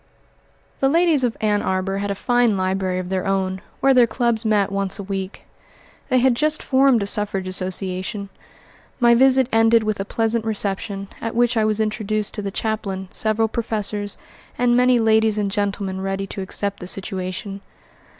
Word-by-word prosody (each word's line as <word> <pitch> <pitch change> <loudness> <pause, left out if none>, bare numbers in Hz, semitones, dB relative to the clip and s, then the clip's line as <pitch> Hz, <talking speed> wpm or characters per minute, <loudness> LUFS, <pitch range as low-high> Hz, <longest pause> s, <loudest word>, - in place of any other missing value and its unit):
The 270 - +3
ladies 325 -3 +3
of 240 -2 0
Ann 210 -1 +1
Arbor 190 +1 -1
had 205 0 -3
a 200 - -1
fine 240 -1 +2
library 185 0 -1
of 185 -1 -4
their 190 0 -2
own, 190 -1 -1 0.2
where 270 0 +5
their 245 -2 +5
clubs 235 -2 0
met 210 -3 +1
once 195 -1 -2
a 200 - -6
week. 195 0 -5 0.7
They 255 - +3
had 255 0 +4
just 305 +5 0
formed 265 -4 +3
a - - -2
suffrage 200 -2 -1
association. 185 +2 -3 0.7
My 240 -1 +5
visit 260 +1 +5
ended 225 0 +4
with 215 -1 -2
a - - 0
pleasant 225 +2 0
reception, 200 -2 -2
at 225 0 -4
which 240 +1 +2
I 220 -1 +2
was 215 0 0
introduced 215 -1 -1
to 210 - -4
the 200 - -3
chaplain, 195 -3 -3
several 220 +1 +1
professors, 210 -2 -2 0.4
and 245 0 +3
many 250 0 +4
ladies 220 -1 +3
and 205 -2 -1
gentlemen 200 -2 -2
ready 195 0 -2
to 195 - -6
accept 200 +1 -4
the 180 - -8
situation. 190 +1 -4
210 Hz, 175 wpm, -21 LUFS, 195-230 Hz, 0.7 s, where